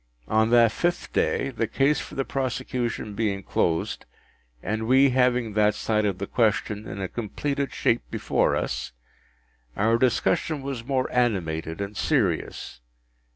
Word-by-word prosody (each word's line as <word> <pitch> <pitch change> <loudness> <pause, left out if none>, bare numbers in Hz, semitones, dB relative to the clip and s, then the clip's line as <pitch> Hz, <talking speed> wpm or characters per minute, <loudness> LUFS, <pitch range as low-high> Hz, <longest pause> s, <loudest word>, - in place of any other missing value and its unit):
On 110 +1 +2
that 120 -1 +5
fifth 175 +7 -2
day, - - +1
the 115 -2 -1
case 140 +5 +2
for - - -8
the 135 - -1
prosecution 125 -4 -3
being 100 -2 -1
closed, 80 -1 -1 0.6
and 110 +3 -2
we 135 +2 +5
having 125 -3 +2
that 105 0 +3
side 110 -1 0
of 100 -3 0
the 100 - -3
question 105 -1 0
in - - -6
a 95 - -2
completed 140 +7 -3
shape 115 - +1
before - - +1
us, - - -3 0.8
our 115 +3 +3
discussion 135 +4 +1
was 135 -4 -4
more 130 0 0
animated 85 -10 0
and 100 +1 -4
serious. - - -1
115 Hz, 145 wpm, -25 LUFS, 105-130 Hz, 0.8 s, that